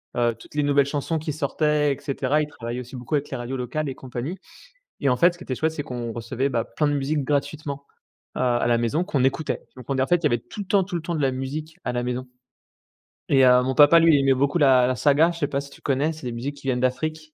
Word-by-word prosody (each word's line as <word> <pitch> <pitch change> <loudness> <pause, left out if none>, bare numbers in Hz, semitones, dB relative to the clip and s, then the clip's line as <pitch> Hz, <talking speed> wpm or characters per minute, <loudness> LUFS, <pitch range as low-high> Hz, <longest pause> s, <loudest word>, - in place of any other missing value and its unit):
heu, 120 -1 +2
toutes - - -15
les 150 - +1
nouvelles 140 -1 +3
chansons 145 +3 -2
qui 155 0 -4
sortaient 150 0 +1
et - - -8
cetera. 140 +1 0
Il 150 - -2
travaillait 120 -3 -6
aussi 125 +1 -9
beaucoup 125 +4 -3
avec 145 0 -1
les - - -4
radios 120 +2 -4
locales 135 +4 -3
et 130 - -5
compagnie 130 +8 -6 0.6
et 140 - +1
en 125 - +3
fait, 175 +6 +4
ce - - -17
qui 180 - -10
était 130 - -3
chouette 160 +4 0
c'est 150 - -4
qu'on 120 -2 -5
recevait, 120 +4 -2
bah, 120 -4 -1
plein 150 -2 -1
de 145 - +1
musiques 145 +1 -1
gratuitement 145 0 -2 0.5
à 125 -1 +1
à - - 0
la 120 - +3
maison, 120 +9 0
qu'on 140 -9 0
écoutait. 140 +3 -1
Donc 125 -2 -11
on 135 - 0
é - - +3
en - - +1
fait, 175 - +5
il 170 - -11
y - - +5
avait 120 -5 +2
tout 160 - -10
le 200 - -5
temps, 195 -1 +3
tout 185 - -8
le 165 - -4
temps 170 0 -3
de 150 - -1
la 135 - +3
musique 150 +5 -5
à - - -1
la 120 0 -1
maison 125 +1 -3 1.0
et 135 -2 +5
heu, 125 0 +6
mon 130 +1 -1
papa, 150 +3 +7
lui, 165 -2 +5
il - - +4
aimait 135 0 +4
beaucoup 140 +5 +1
la 130 -3 +5
la 130 - 0
saga, 150 +5 +4
je 170 - -8
sais 145 - +1
pas 140 0 -1
si 140 - -11
tu - - -16
connais, 145 +4 0
c'est 155 - -11
des - - -3
musiques 135 +5 -4
qui 135 - -10
viennent 125 -2 +1
d'Afrique. 155 +5 -2
140 Hz, 285 wpm, -24 LUFS, 125-155 Hz, 1.0 s, papa